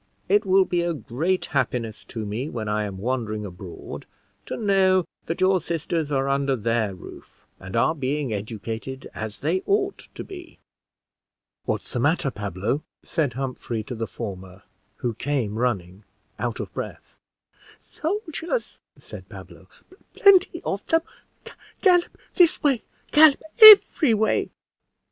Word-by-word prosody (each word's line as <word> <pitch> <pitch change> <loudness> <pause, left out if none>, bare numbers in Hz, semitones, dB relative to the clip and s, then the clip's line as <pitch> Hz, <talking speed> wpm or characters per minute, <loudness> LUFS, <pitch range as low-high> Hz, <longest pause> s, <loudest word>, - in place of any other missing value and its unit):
It 200 +1 +2
will 190 0 +5
be 175 -1 0
a 170 -1 -1
great 155 - -2
happiness 120 -5 -1
to 110 -2 -6
me 115 +8 -4
when 110 -6 -5
I 105 0 0
am 100 -2 -6
wandering 110 -1 -3
abroad 90 -2 -9 0.4
to - - -4
know 190 -4 +3 0.2
that 165 - -3
your 185 -1 +3
sisters 165 -2 -3
are 135 -1 0
under 140 0 +1
their 115 -3 -1
roof, 90 - -14
and 95 +1 -8
are 115 +7 +3
being 140 -3 -2
educated 110 +5 -6
as 110 -1 -7
they 170 +6 0
ought 400 -1 0
to - - -6
be." 355 -3 -11 1.1
"What's - - -3
the 125 - -1
matter, 145 +1 +1
Pablo?" 100 - -3 0.2
said 150 -8 -1
Humphrey 125 -3 -4
to 125 - -7
the 115 -1 -4
former, 95 -2 -8 0.3
who 120 0 -3
came 115 -4 -2
running, 100 -5 -2 0.4
out - - -3
of - - -6
breath. - - -8 0.7
"Soldiers," 345 +4 -3 0.2
said - - -12
Pablo, - - -12 0.5
"plenty 375 -3 +5
of 200 - -2
them, 325 0 +3 0.8
gallop 355 -3 +3 0.2
this 350 -3 +3
way 270 -6 +2 0.3
gallop 300 -2 +6 0.2
every 395 - +9
way." 220 +1 +1
135 Hz, 140 wpm, -24 LUFS, -, 1.1 s, every